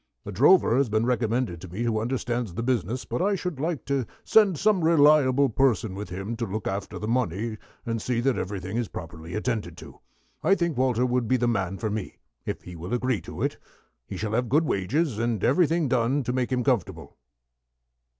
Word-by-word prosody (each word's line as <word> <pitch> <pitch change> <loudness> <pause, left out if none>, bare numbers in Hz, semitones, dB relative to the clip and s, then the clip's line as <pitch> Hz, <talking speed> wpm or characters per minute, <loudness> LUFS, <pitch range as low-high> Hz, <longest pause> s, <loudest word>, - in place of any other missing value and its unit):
A - - -5
drover 140 - +5
has 135 -3 +2
been 110 +2 +1
recommended 120 -6 0
to 95 - -8
me 95 +7 -4
who 115 -2 0
understands 120 -4 -2
the 115 - -2
business, 125 -1 -1
but - - -3
I 200 +2 +2
should 180 -6 -4
like 160 0 -2
to 135 -4 -1 0.2
send 205 -6 +4
some 200 -2 +2
reliable 145 -4 +5
person 115 -4 +1
with 100 +2 -6
him 95 +5 -4
to 115 - -2
look 105 +2 -4
after 95 +1 -4
the 105 - -5
money, 110 -2 -1 0.3
and 115 -1 -2
see 120 0 -1
that 135 0 +2
everything 95 +1 -4
is 120 -2 -1
properly 80 +1 -8
attended 105 -6 -2
to. - - -12 0.4
I 195 - +4
think 170 -4 -1
Walter 125 -1 +2
would 125 -2 0
be 130 - +3
the 120 0 +1
man 95 -5 -1
for 110 0 -2
me, 105 -2 -5 0.3
if - - -4
he 90 - -9
will 90 +8 -3
agree 125 -2 0
to - - -6
it. - - -2 0.5
He - - -6
shall 110 -1 -3
have 120 +1 0
good 155 +6 +3
wages, 125 - 0
and 115 -3 -1
everything 165 +2 +3
done 130 +2 +1
to 125 +1 -2
make 130 0 -1
him 125 -1 +1
comfortable." 95 - -1
120 Hz, 205 wpm, -26 LUFS, 105-135 Hz, 0.5 s, drover